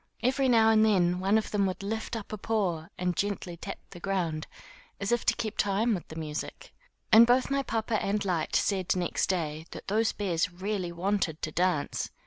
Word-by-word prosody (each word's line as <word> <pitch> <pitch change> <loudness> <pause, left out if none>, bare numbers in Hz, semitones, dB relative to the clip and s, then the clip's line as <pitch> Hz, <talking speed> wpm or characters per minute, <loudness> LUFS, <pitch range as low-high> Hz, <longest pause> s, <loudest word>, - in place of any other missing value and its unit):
Every 265 +2 +2
now 225 -2 +5
and 220 -1 +5
then 180 -4 +3
one 195 +3 +3
of 220 - -2
them 200 -2 +2
would 185 +1 -4
lift 220 +3 -3
up 215 -1 -6
a - - -3
paw 185 -8 -1
and 180 -1 -1
gently 200 -3 -2
tap 195 +4 -7
the 175 - -10
ground, 170 -5 -2 0.5
as 200 +2 -2
if 240 - +1
to - - +4
keep 225 -2 -4
time 205 +4 +2
with 180 - -4
the 160 - -10
music. 160 - -6 0.4
And 230 +1 +9
both 250 +2 +3
my 275 0 +2
papa 225 -3 -1
and 205 +1 -1
Lyte 175 -4 -1
said 190 -3 +1
next 180 -1 0
day 160 -3 -2
that - - -8
those 220 +2 +2
bears 185 -2 -1
really 185 0 -3
wanted 175 -2 -1
to 155 - -2
dance. 175 -3 0
195 Hz, 200 wpm, -29 LUFS, 175-220 Hz, 0.5 s, And